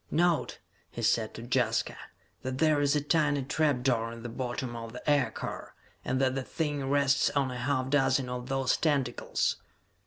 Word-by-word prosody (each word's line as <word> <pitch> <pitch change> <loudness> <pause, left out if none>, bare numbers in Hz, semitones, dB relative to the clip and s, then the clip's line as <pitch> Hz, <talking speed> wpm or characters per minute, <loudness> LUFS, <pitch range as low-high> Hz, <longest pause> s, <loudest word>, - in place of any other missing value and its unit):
"Note," 170 -1 +1 0.3
he 120 - -6
said 110 -1 +2
to 115 - -7
Jaska, 120 -2 0 0.5
"that 130 0 -4
there 155 -1 +3
is 145 0 +3
a 150 - +2
tiny 145 -2 +2
trap 145 -2 +1
door 115 -3 +1
in 115 0 -9
the 120 - -5
bottom 120 0 -4
of 115 -1 -7
the 125 - -9
aircar, 145 -2 -1 0.3
and 130 - -1
that 130 -1 +2
the 135 - -1
thing 145 -1 -2
rests 140 -1 +3
on 140 -2 0
a 125 - -5
half 130 0 -1
dozen 135 -2 +3
of 125 +1 -5
those 135 -1 +1
tentacles!" 140 -6 0
130 Hz, 180 wpm, -29 LUFS, 125-145 Hz, 0.5 s, there